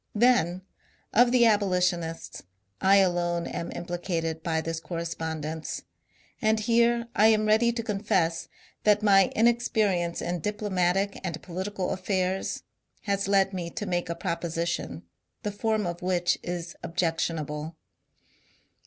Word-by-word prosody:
Then, 200 -6 +3 0.5
of 240 +2 +5
the 245 -1 +5
abolitionists, 180 -6 +1 0.4
I 195 +1 +5
alone 175 -3 +2
am 170 - -4
implicated 170 -2 -3
by 160 -1 0
this 165 0 -3
correspondence. 160 -2 -4 0.6
And 220 -1 +3
here 235 +1 +3
I 215 - +6
am 215 -1 +4
ready 220 +2 +4
to 235 -1 -3
confess 195 -6 0 0.4
that 210 0 +4
my 195 -2 +5
inexperience 215 -7 +2
in 175 0 -2
diplomatic 195 -1 0
and 170 -4 -3
political 185 +1 -3
affairs 190 0 -1 0.4
has 200 -2 0
led 195 -1 +3
me 175 -2 -3
to 215 +3 -5
make 175 -2 -1
a 170 - -2
proposition, 170 - -3 0.4
the 210 - -2
form 215 0 0
of 175 0 -4
which 180 -1 +1
is 175 -1 -5
objectionable. 160 -2 -2
185 Hz, 125 wpm, -27 LUFS, 170-210 Hz, 0.6 s, I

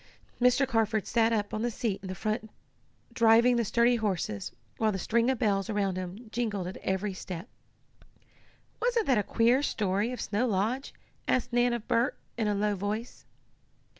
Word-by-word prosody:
Mr. 250 +2 +4
Carford 220 -2 +1
sat 230 0 +2
up 205 -2 -1
on 215 - -2
the 240 - +1
seat 220 -3 -2
in 190 - -5
front 215 +3 -2 0.6
driving 230 +1 +5
the 235 - +2
sturdy 235 +3 +3
horses, 180 - -2 0.3
while 220 -1 +2
the 195 - -2
string 230 +5 +1
of 265 - +1
bells 200 -3 +1
around 200 -3 0
them 185 +5 -6
jingled 215 -6 -2
at 185 - -6
every 190 +1 -2
step. 185 +1 -7 1.3
"Wasn't 475 -2 +2
that 255 -5 +3
a - - 0
queer 235 +6 +3
story 205 -3 0
of 250 - -5
Snow 215 +5 0
Lodge?" 225 +6 -1 0.4
asked 250 -1 0
Nan 245 0 +3
of 235 -2 -4
Bert, 235 +4 +1 0.2
in 225 -2 -1
a 205 - +1
low 205 0 +1
voice. 210 +5 -4
220 Hz, 170 wpm, -29 LUFS, 200-240 Hz, 1.3 s, driving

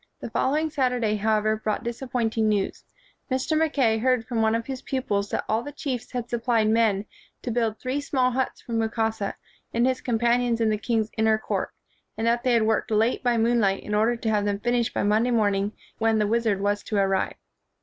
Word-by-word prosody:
The - - -7
following 305 +4 +1
Saturday, 250 -6 +1
however, 215 +1 +1
brought 215 +2 -2
disappointing 235 -2 -1
news. 205 -2 -1 0.5
Mr. 260 +4 0
Mackay 280 -8 +2
heard 250 -1 +1
from 235 -2 -1
one 220 0 +3
of 230 0 -2
his 265 -2 -5
pupils 205 -7 -2
that - - -2
all 220 +1 +1
the 290 - -7
chiefs 270 -5 -4
had 245 -1 -3
supplied 230 -2 +1
men 215 -3 +2 0.4
to 245 - -2
build 225 -2 0
three 260 +3 -2
small 260 -3 +1
huts 260 +1 -2
for - - -11
Mukasa 225 -2 -1 0.4
and 235 +1 +3
his 260 0 0
companions 240 0 +1
in 225 -1 +2
the 215 - +1
king's 225 -1 -1
inner 220 0 +4
court, 220 - -2 0.5
and 225 - -1
that 235 +1 +2
they 250 0 +2
had 230 -2 +4
worked 220 0 +1
late 225 +2 +2
by 245 -2 +2
moonlight 225 -4 +2
in 210 - -5
order 220 +3 +3
to 230 -1 -3
have 210 -1 +1
them 200 -1 -1
finished 240 +1 0
by - - -1
Monday 215 +4 +2
morning 205 -3 +1 0.3
when 225 0 +2
the 210 - +2
wizard 220 -2 +1
was 205 +1 0
to 215 - -5
arrive. 195 -1 +1
225 Hz, 200 wpm, -25 LUFS, 215-245 Hz, 0.5 s, inner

